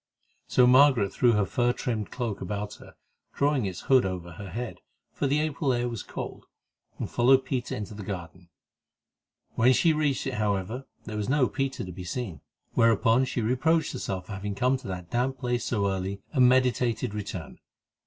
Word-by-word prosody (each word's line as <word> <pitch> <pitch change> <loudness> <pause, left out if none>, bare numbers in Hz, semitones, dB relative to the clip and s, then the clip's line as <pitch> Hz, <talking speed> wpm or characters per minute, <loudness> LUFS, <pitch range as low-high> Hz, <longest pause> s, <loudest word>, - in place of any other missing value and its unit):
So 125 - +5
Margaret 125 -5 +5
threw 120 -2 +4
her 105 -2 +2
fur 120 +6 +1
trimmed 115 -7 -3
cloak 115 -6 -4
about 100 +2 -4
her, - - -14 0.4
drawing 140 -6 +2
its 90 -3 -5
hood 130 -2 +4
over 90 -2 -4
her 100 +3 -8
head, 115 +6 -5 0.3
for 140 - -1
the 145 +2 +2
April 145 -3 0
air 120 0 0
was 115 -3 -4
cold, - - -7 0.5
and - - -3
followed 130 +2 +4
Peter 130 -2 -2
into 105 +1 -6
the 105 - -8
garden. 90 -3 -7 1.0
When 125 +3 +4
she 160 +5 +4
reached 150 -4 0
it, 135 - -2
however, 105 +3 -2 0.2
there 110 -1 -5
was 105 +2 -2
no 135 -2 +3
Peter 135 -5 -2
to 90 - -7
be 90 +1 -8
seen, 90 - -5 0.3
whereon 115 +2 +4
she 125 -1 -2
reproached 155 +8 +1
herself 95 -2 -4
for - - -11
having 100 0 -4
come 125 +5 +2
to 130 - -11
that 90 -2 -6
damp 130 +2 0
place 120 -1 -1
so 100 -4 0
early 95 +1 -4
and 130 -4 +6
meditated 125 -4 +2
return. 100 -6 -6
120 Hz, 185 wpm, -27 LUFS, 100-130 Hz, 1.0 s, and